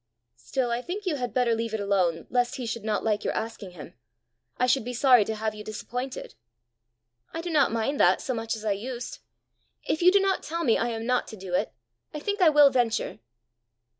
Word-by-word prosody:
"Still 240 Hz, -, -2 dB
I 235 Hz, +1 st, -1 dB
think 390 Hz, +9 st, -6 dB
you 330 Hz, -6 st, 0 dB
had 245 Hz, -2 st, -3 dB
better 245 Hz, -2 st, +2 dB
leave 225 Hz, -1 st, -2 dB
it -, -, -3 dB
alone 190 Hz, -5 st, +1 dB
lest 245 Hz, 0 st, +1 dB
he 255 Hz, -, -5 dB
should 230 Hz, -1 st, -4 dB
not 215 Hz, -1 st, -1 dB
like 215 Hz, -2 st, 0 dB
your -, -, -1 dB
asking 220 Hz, -4 st, -5 dB
him. 165 Hz, -, -11 dB, 0.6 s
I 250 Hz, -, +2 dB
should 250 Hz, 0 st, +2 dB
be 245 Hz, +2 st, -5 dB
sorry 250 Hz, -2 st, +6 dB
to 220 Hz, -, -3 dB
have 215 Hz, 0 st, -2 dB
you 210 Hz, 0 st, -9 dB
disappointed." 245 Hz, +5 st, -6 dB, 1.0 s
"I 330 Hz, -, -2 dB
do 345 Hz, 0 st, -4 dB
not 290 Hz, -7 st, +3 dB
mind 230 Hz, +5 st, -1 dB
that -, -, +5 dB
so 260 Hz, -, -3 dB
much 225 Hz, -1 st, -2 dB
as 220 Hz, 0 st, -9 dB
I 210 Hz, -, +1 dB
used. 235 Hz, +4 st, -5 dB, 0.6 s
If 315 Hz, -, -1 dB
you 360 Hz, +1 st, +7 dB
do 400 Hz, -, +5 dB
not 390 Hz, -1 st, +1 dB
tell 335 Hz, +2 st, -3 dB
me 230 Hz, -6 st, +4 dB
I 230 Hz, -, 0 dB
am 225 Hz, -1 st, -4 dB
not 250 Hz, 0 st, +1 dB
to 220 Hz, -, -9 dB
do 185 Hz, -2 st, -8 dB
it, -, -, +1 dB, 0.4 s
I -, -, -3 dB
think 405 Hz, +5 st, -2 dB
I 345 Hz, -, +7 dB
will 295 Hz, -2 st, +6 dB
venture." 245 Hz, -3 st, 0 dB
240 Hz, 225 wpm, -26 LUFS, 220-275 Hz, 1.0 s, you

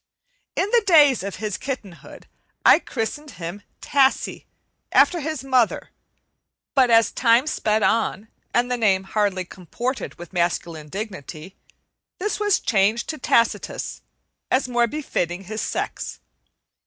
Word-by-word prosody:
In -, -, +1 dB
the 475 Hz, -, +5 dB
days 295 Hz, -, +6 dB
of 200 Hz, 0 st, -5 dB
his 210 Hz, -1 st, -4 dB
kittenhood 215 Hz, -10 st, -7 dB, 0.4 s
I -, -, +8 dB
christened 290 Hz, +6 st, -4 dB
him 175 Hz, +4 st, -6 dB, 0.2 s
"Tassie" 275 Hz, -1 st, +1 dB, 0.5 s
after 350 Hz, -, +4 dB
his 310 Hz, -3 st, -4 dB
mother; 255 Hz, -4 st, +1 dB, 0.8 s
but 260 Hz, -3 st, +4 dB
as 230 Hz, -1 st, +5 dB
time 235 Hz, +2 st, +3 dB
sped 220 Hz, -8 st, 0 dB
on, 220 Hz, -1 st, +1 dB, 0.2 s
and 245 Hz, +1 st, +1 dB
the 250 Hz, -, +1 dB
name 195 Hz, -5 st, +2 dB
hardly 195 Hz, -2 st, -1 dB
comported 240 Hz, +10 st, -5 dB
with 175 Hz, 0 st, -11 dB
masculine 170 Hz, -3 st, -1 dB
dignity, 190 Hz, -3 st, -7 dB, 0.6 s
this 420 Hz, +3 st, -2 dB
was 415 Hz, -2 st, +2 dB
changed 215 Hz, +1 st, +1 dB
to 310 Hz, -, -4 dB
Tacitus, 235 Hz, -2 st, 0 dB, 0.5 s
as 260 Hz, 0 st, +2 dB
more 240 Hz, -1 st, +2 dB
befitting 195 Hz, -, -3 dB
his 220 Hz, +3 st, -5 dB
sex. -, -, -4 dB
230 Hz, 130 wpm, -23 LUFS, 190-265 Hz, 0.8 s, I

